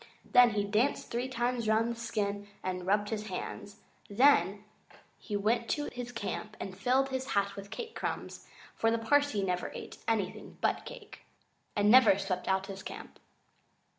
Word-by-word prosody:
Then 245 -3 +6
he 205 - +2
danced 215 +7 0
three 240 +2 -1
times 240 -2 -1
round 220 +2 +3
the - - -4
skin 205 -3 -3 0.2
and 180 -1 -3
rubbed 205 +1 +2
his 215 -1 -3
hands. 200 +1 -6 0.3
Then 205 -4 +4 0.6
he 205 - -3
went 230 +3 +1
to 295 - -3
his 245 0 -5
camp 215 -2 -5
and 190 - -6
filled 255 +7 +2
his 260 0 -3
hat 200 0 +1
with 200 0 -8
cake 465 - -6
crumbs, - - -5 0.3
for 225 - +1
the 230 - +2
Parsee 225 -2 +2
never 180 -1 -2
ate - - -8
anything 220 -4 -2
but - - 0
cake, - - -10 0.6
and 205 0 +4
never 245 -6 +7
swept 195 -2 -3
out 190 0 +1
his 195 -1 -7
camp. - - -9
215 Hz, 165 wpm, -31 LUFS, 200-245 Hz, 0.6 s, never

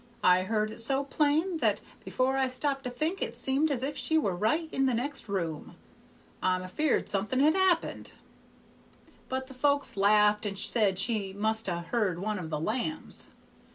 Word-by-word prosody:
I 180 0 +5
heard 215 +2 -1
it 220 - -8
so 270 +4 +1
plain 305 +5 +1
that - - +2 0.2
before 260 +1 0
I 265 -1 +2
stopped 275 +1 -1
to - - -1
think 310 +10 -2
it 230 - -2
seemed 270 +5 +1
as 260 -3 -1
if 285 +2 -2
she 320 - +1
were 200 - 0
right 225 - 0
in 270 0 +2
the 255 - +1
next 270 -1 -3
room. 165 -6 -4 0.7
I'm 185 0 +1
afeard 270 +11 0
something 210 +6 -1
has 305 +2 +5
happened.' 375 -2 +1 1.2
But 260 0 -2
the 265 - -12
folks 280 0 +1
laughed, 210 +1 +4
and 200 -2 -3
said 200 -3 +1
she 200 -2 -1
must 220 +2 0
ha' 175 -2 -2
heard 190 -2 0
one 210 +2 -3
of 165 -3 -6
the 155 -1 -2
lambs. 245 - -2
235 Hz, 180 wpm, -29 LUFS, 200-280 Hz, 1.2 s, I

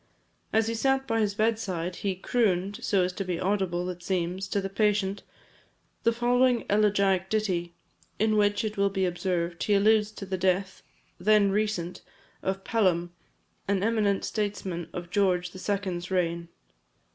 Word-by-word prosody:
As 220 0 +3
he 230 - -1
sat 270 +3 +1
by 225 -3 0
his 205 -2 0
bed 220 +1 +2
side, 180 -4 -3
he 195 -3 -2
"crooned," 195 -1 0
so 195 -3 +2
as 180 0 -1
to 195 - -3
be 180 -2 -3
audible, 185 -3 0
it 180 -1 -6
seems, 185 +1 -2
to 200 - 0
the 195 - -2
patient, 200 0 0 0.8
the 230 - +3
following 245 +1 +2
elegiac 200 -3 +2
ditty, 180 -6 -1 0.4
in 215 +1 +2
which, 205 +1 +2
it 215 -1 -4
will 200 0 +3
be 195 -1 0
observed, 175 -1 -2
he 205 - +2
alludes 210 +1 +4
to 200 - -7
the 190 -1 -3
death, 185 +1 0 0.4
then 205 +1 +4
recent, 200 -4 -1 0.4
of 195 0 -2
Pelham, 175 -6 +1 0.5
an 200 -1 +1
eminent 210 -3 +1
statesman 195 -5 -3
of 175 -1 -7
George 180 -3 +1
the 185 - -10
Second's 185 -3 -2
reign. 170 -2 -1
195 Hz, 160 wpm, -27 LUFS, 180-210 Hz, 0.8 s, alludes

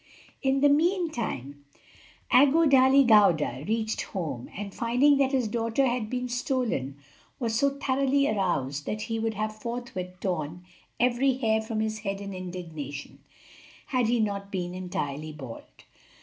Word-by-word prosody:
= - - -29
In 270 0 +1
the 290 - +6
meantime, 285 - 0 0.7
Aggo 290 +5 +6
Dali 270 0 +6
Gauda 170 - +4
reached 220 0 -1
home, 150 - -5
and 200 -1 -5
finding 250 +5 +3
that 270 -1 +2
his 260 -4 +1
daughter 230 +4 0
had 240 -4 -1
been 250 0 -2
stolen, 240 - -2 0.4
was 230 -3 -1
so 280 +5 +3
thoroughly 275 +1 +2
aroused 145 -9 -1
that 210 0 -2
he 225 0 -3
would 225 -1 -1
have 215 +1 -2
forthwith 215 -6 -6
torn 175 -1 -3 0.3
every 250 +3 +3
hair 220 -4 +1
from 220 0 -3
his 215 0 -2
head 195 -2 -3
in 200 -1 -6
indignation, 165 -6 -7 0.7
had 255 -4 +1
he 240 +1 +2
not 200 -2 -2
been 180 -2 -3
entirely 155 -5 -4
bald. 135 -6 -9
220 Hz, 150 wpm, -27 LUFS, 180-255 Hz, 0.7 s, the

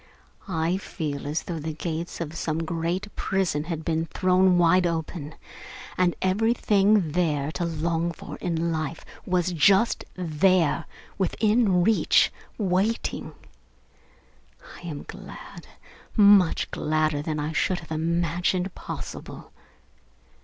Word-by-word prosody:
I 165 0 0
feel 150 -7 -5
as 150 +3 -2
though 170 -2 -4
the 155 +1 -4
gates 160 +2 -4
of 160 -2 -4
some 165 0 -2
great 170 +5 -3
prison 180 -6 -1
had 160 -2 -4
been 165 0 0
thrown 185 +1 +3
wide 175 +1 +4
open, 160 -2 -4 0.6
and 180 -1 +2
everything 205 -2 +3
there 155 -4 +1
was 155 - -4
to 175 - -2
long 165 +1 -1
for 165 - -9
in 170 -1 -1
life 155 0 -3 0.2
was 180 -1 +1
just 195 +7 +3
there, 170 -1 +2 0.3
within 210 -1 +2
reach, 220 +3 +3 0.2
waiting. 200 +3 -1 1.4
I 175 - -10
am 150 -3 -5
glad, - - -10 0.5
so 215 - +3
much 200 -4 +5
gladder 155 -1 0
than 155 0 -3
I 150 +1 -2
should 180 +2 0
have 160 - -15
imagined 170 +3 0
possible. - - -8
170 Hz, 125 wpm, -25 LUFS, 160-185 Hz, 1.4 s, much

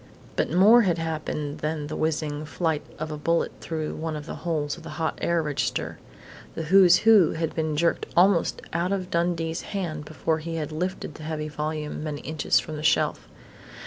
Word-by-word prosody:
But - - 0
more 205 +8 +7
had 180 -6 +1
happened 155 -2 -3
than 155 -1 -2
the 150 - -5
whizzing 155 -1 -1
flight 160 -1 -1 0.2
of 155 +1 -4
a 150 - -5
bullet 165 +2 +1
through 155 -2 -3
one 160 0 -4
of 150 -1 -6
the - - -6
holes 155 -4 -1
of - - -12
the - - -9
hot 160 -1 -2
air 170 -1 +1
register. 150 -2 -2 0.6
The 165 - -3
"Who's 180 +2 +7
Who" 215 -7 +7
had 160 0 -2
been 155 -2 -1
jerked 170 +2 +1
almost 180 -1 +3
out 170 +3 0
of 185 -2 -2
Dundee's 170 -1 0
hand 165 -7 -4
before 155 +2 -1
he 165 +1 -5
had 155 -1 -3
lifted 175 0 -3
the 155 - -11
heavy 155 -1 -3
volume 150 0 -4
many 150 -2 -4
inches 155 -1 +1
from 155 -1 -6
the - - -5
shelf. 155 - +1
160 Hz, 190 wpm, -26 LUFS, 150-170 Hz, 0.6 s, more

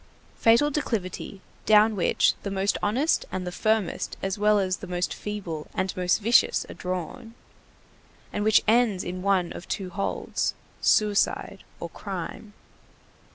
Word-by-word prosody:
Fatal 235 +6 +4
declivity 205 -8 -3 0.3
down 215 0 +6
which 185 - +3
the 200 - -4
most 195 +1 0
honest 255 +10 +1
and 185 -1 -3
the 180 - -4
firmest 215 0 -1
as 195 0 -1
well 210 0 +3
as 190 -1 0
the - - -9
most 180 0 -2
feeble 185 -7 -5
and 190 0 -1
most 180 -1 +2
vicious 230 +3 +3
are - - -8
drawn, 185 +5 -5 1.0
and 205 - -1
which 215 -1 +4
ends 220 -4 +3
in 180 +1 -5
one 190 -3 +1
of - - -9
two 190 -3 -4
holds, 195 +3 -2 0.3
suicide 205 -1 +1 0.2
or 170 - -4
crime. 195 +3 -7
200 Hz, 145 wpm, -26 LUFS, 185-215 Hz, 1.0 s, down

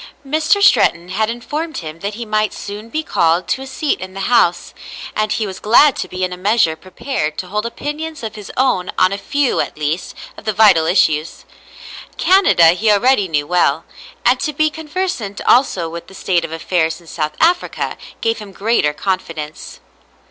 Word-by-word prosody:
Mr. 315 +7 +2
Stretton 170 - +4
had 215 +4 0
informed 295 +8 -4
him 155 -1 -7
that 200 +3 -4
he 235 +1 -6
might 215 -1 0
soon 210 +2 -8
be 310 +5 -2
called 170 - +1
to 265 - -1
a 270 - -7
seat 280 +3 -2
in 185 0 -8
the 195 - -5
House, 190 -5 +2 0.4
and 215 0 0
he 220 - -1
was 190 -2 -7
glad 250 +6 +5
to - - -4
be 185 0 -5
in 180 0 -1
a - - -7
measure 195 -4 +2
prepared 160 - -4
to - - -4
hold 210 +5 -2
opinions 295 +5 -6
of 220 -1 -4
his 210 -2 -9
own 250 -9 +1
on 185 +1 +4
a - - -2
few, 285 +2 0
at - - -2
least, 155 +3 -3 0.2
of - - -12
the 215 - 0
vital 190 -7 +5
issues. 155 -3 +1 0.7
Canada 365 - +5
he 195 +6 +2
already 210 0 +3
knew 150 -3 -1
well, 165 -2 +1 0.4
and 250 +1 +4
to 300 - -2
be 310 +2 +1
conversant 310 - -4
also 190 -9 +3
with 170 +1 -8
the 190 - -14
state 180 -2 0
of 165 - -6
affairs 165 0 -1
in 170 - -19
South 155 -2 -3
Africa 350 +2 +1 0.3
gave 225 0 0
him 210 -2 -10
greater 195 -7 +1
confidence. 160 -3 -5
205 Hz, 190 wpm, -17 LUFS, 170-255 Hz, 0.7 s, glad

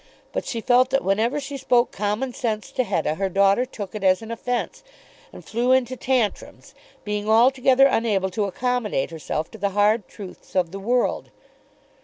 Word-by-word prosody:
But - - -3
she 230 - -3
felt 250 +2 +3
that 270 +1 +1
whenever 220 +8 +1
she 280 0 -6
spoke 250 -2 +2
common 210 +5 -2
sense 220 -4 -3
to 255 - 0
Hetta, 195 -7 -1
her 195 0 -1
daughter 200 +5 +3
took 205 -6 -8
it 210 -2 -6
as 185 +2 +3
an 225 - -8
offence, 245 +1 -3 0.5
and - - -13
flew 245 +3 +1
into 260 -1 +1
tantrums, 245 -3 -2 0.3
being 210 0 -3
altogether 260 +3 +5
unable 210 -7 +1
to 205 +2 -1
accommodate 215 - -1
herself 160 -1 -4
to 220 - -11
the 200 0 0
hard 210 0 +3
truths 190 -2 -12
of 180 -3 +1
the 195 - -6
world. 240 +5 0
220 Hz, 175 wpm, -23 LUFS, 200-250 Hz, 0.5 s, altogether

